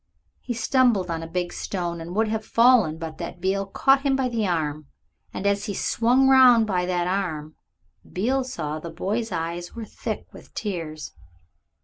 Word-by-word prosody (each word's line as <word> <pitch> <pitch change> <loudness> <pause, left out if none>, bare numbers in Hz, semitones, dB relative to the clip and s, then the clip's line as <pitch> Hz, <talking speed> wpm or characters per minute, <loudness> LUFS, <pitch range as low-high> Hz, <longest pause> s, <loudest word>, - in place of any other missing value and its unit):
He 240 - -5
stumbled 225 -6 +2
on 165 -1 -2
a 165 - -6
big 175 +1 -3
stone 175 -3 -4
and 170 +3 -7
would 220 +1 +2
have 220 0 -2
fallen 230 -9 +4
but 160 -1 -7
that - - -6
Beale 195 +2 -1
caught 270 +7 +3
him 275 -1 +1
by 265 -1 0
the 225 -4 -1
arm, 155 -4 -2 0.4
and 195 - -6
as 200 0 +1
he 205 -3 -4
swung 250 +7 +2
round 255 -4 +7
by 180 -4 -1
that 175 -1 0
arm 170 -5 -2 0.6
Beale 255 +8 0
saw 155 -12 -4
that 170 - -7
the 165 - -13
boy's 215 +6 -2
eyes 170 +1 -4
were 230 -1 -6
thick - - -5
with - - -15
tears. 160 -7 -5
195 Hz, 185 wpm, -24 LUFS, 170-230 Hz, 0.6 s, round